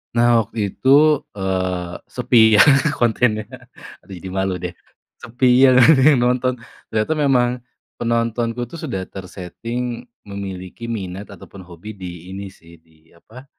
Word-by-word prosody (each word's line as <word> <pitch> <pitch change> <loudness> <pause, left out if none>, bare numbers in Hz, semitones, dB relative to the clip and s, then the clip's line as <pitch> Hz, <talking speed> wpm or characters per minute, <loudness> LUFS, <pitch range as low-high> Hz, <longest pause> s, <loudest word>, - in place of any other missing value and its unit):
Nah 120 -1 +4
waktu 105 -2 -4
itu, 145 +2 +4 0.2
eee, 95 -2 -2 0.2
sepi 110 -3 +4
ya - - +8 0.4
kontennya, 110 -2 +1 0.6
aduh 100 - -13
jadi 95 +2 -9
malu 95 -1 -1
deh, 90 0 -6 0.5
sepi 120 +3 -2 0.2
iya 135 - +7
nggak 125 - +7
ada 130 - +2
yang 140 - +4
nonton 125 +1 +1 0.4
ternyata 110 +8 0
memang 135 -5 +2 0.5
penontonku 115 +1 -1
tuh 165 +7 -11
sudah 95 - -4
ter-setting 115 - -7 0.2
memiliki 100 +2 -7
minat 100 -2 -6
ataupun 100 0 -13
hobi 90 +4 -11
di 90 -1 -9
ini 100 0 -7
sih 85 -3 -19
di 80 0 -28
apa, 120 +10 -15
110 Hz, 140 wpm, -20 LUFS, 95-120 Hz, 0.6 s, ya